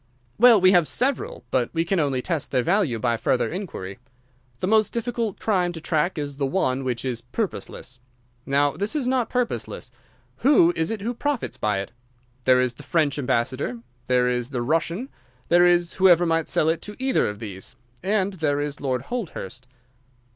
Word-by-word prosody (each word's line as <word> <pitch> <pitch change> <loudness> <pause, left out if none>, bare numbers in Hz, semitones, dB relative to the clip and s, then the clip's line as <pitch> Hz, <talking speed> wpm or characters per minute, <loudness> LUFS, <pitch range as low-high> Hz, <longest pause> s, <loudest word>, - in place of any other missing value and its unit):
"Well, 235 -2 +8
we 185 0 +6
have 175 -5 +4
several, 270 +2 -1
but 125 -2 +1
we 165 0 0
can 185 +2 +1
only 135 -4 0
test 165 -5 -2
their 125 -2 +1
value 170 - +1
by 115 +1 0
further 125 - 0
inquiry. 145 - -6 0.6
The - - -1
most 215 +2 +3
difficult 235 -3 -2
crime 185 -5 +1
to 165 - -6
track 160 +2 0
is 145 -2 -4
the 140 - 0
one 135 -4 0
which 125 -1 -2
is 120 -3 -2
purposeless. 130 - -5 0.4
Now 145 +1 +2
this 205 - -3
is 275 -5 0
not 255 -2 +1
purposeless. 235 - -3 0.5
Who 225 - +5
is 160 0 0
it 225 -3 -3
who 235 +4 -2
profits 285 +1 -2
by 105 -2 0
it? 100 - -8 0.5
There 130 -1 +5
is 125 -1 +1
the - - -13
French 150 -4 0
ambassador, 125 -1 -1 0.3
there 125 -1 +3
is 125 0 -1
the 125 -4 -2
Russian, 165 - -1 0.4
there 175 +1 +6
is 175 -1 +2
whoever 175 -2 +5
might 165 -1 0
sell 155 - +2
it 160 +1 +1
to 210 - -8
either 265 0 +1
of 105 - -6
these, 100 -4 -8 0.3
and 200 0 +1
there 150 -5 0
is 145 -1 -4
Lord 130 -3 -1
Holdhurst." 135 - -6
160 Hz, 185 wpm, -24 LUFS, 130-200 Hz, 0.6 s, Well